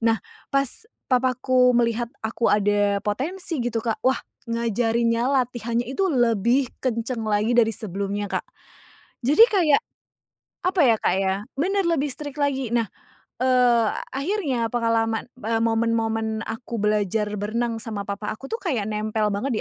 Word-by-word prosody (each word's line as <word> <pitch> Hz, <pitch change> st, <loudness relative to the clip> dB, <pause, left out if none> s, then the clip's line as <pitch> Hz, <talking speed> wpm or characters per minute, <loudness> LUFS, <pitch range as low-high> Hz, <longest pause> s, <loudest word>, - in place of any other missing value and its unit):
Nah, 225 Hz, 0 st, +3 dB, 0.3 s
pas 275 Hz, -, -1 dB, 0.2 s
papaku 255 Hz, 0 st, +3 dB
melihat 235 Hz, 0 st, +1 dB, 0.2 s
aku 230 Hz, +1 st, 0 dB
ada 205 Hz, -1 st, +2 dB
potensi 300 Hz, -, -2 dB
gitu 235 Hz, -1 st, -1 dB
Kak 220 Hz, -2 st, -1 dB
wah 260 Hz, +1 st, +3 dB, 0.3 s
ngajarinnya 230 Hz, 0 st, +1 dB
latihannya 240 Hz, -3 st, 0 dB
itu 380 Hz, +9 st, 0 dB
lebih 240 Hz, 0 st, +2 dB
kencang 235 Hz, -1 st, -2 dB
lagi 215 Hz, +2 st, +1 dB
dari 225 Hz, -1 st, +4 dB
sebelumnya 200 Hz, 0 st, -3 dB
Kak, -, -, -2 dB, 0.8 s
jadi 295 Hz, -, +3 dB
kayak 350 Hz, -3 st, +3 dB, 0.8 s
apa 365 Hz, 0 st, +1 dB
ya 230 Hz, -3 st, +5 dB
Kak -, -, +2 dB
ya? 190 Hz, -1 st, +1 dB, 0.2 s
Bener 385 Hz, +6 st, +1 dB
lebih 295 Hz, -4 st, +1 dB
strict 290 Hz, 0 st, -7 dB
lagi. 270 Hz, -4 st, 0 dB
Nah, 230 Hz, -2 st, +2 dB, 0.6 s
eee, 245 Hz, -3 st, +4 dB, 0.3 s
akhirnya 275 Hz, -, -1 dB
pengalaman, 230 Hz, -1 st, 0 dB
eee, 225 Hz, +1 st, 0 dB
momen-momen 225 Hz, -1 st, 0 dB
aku 230 Hz, +1 st, -5 dB
belajar 210 Hz, 0 st, +1 dB
berenang 230 Hz, +3 st, -1 dB
sama 215 Hz, -3 st, -4 dB
papa 200 Hz, +1 st, -4 dB
aku 245 Hz, -, -11 dB
tuh 455 Hz, -, -2 dB
kayak 255 Hz, -, -1 dB
nempel 215 Hz, 0 st, -1 dB
banget 255 Hz, +7 st, -2 dB
230 Hz, 140 wpm, -24 LUFS, 220-260 Hz, 0.8 s, ya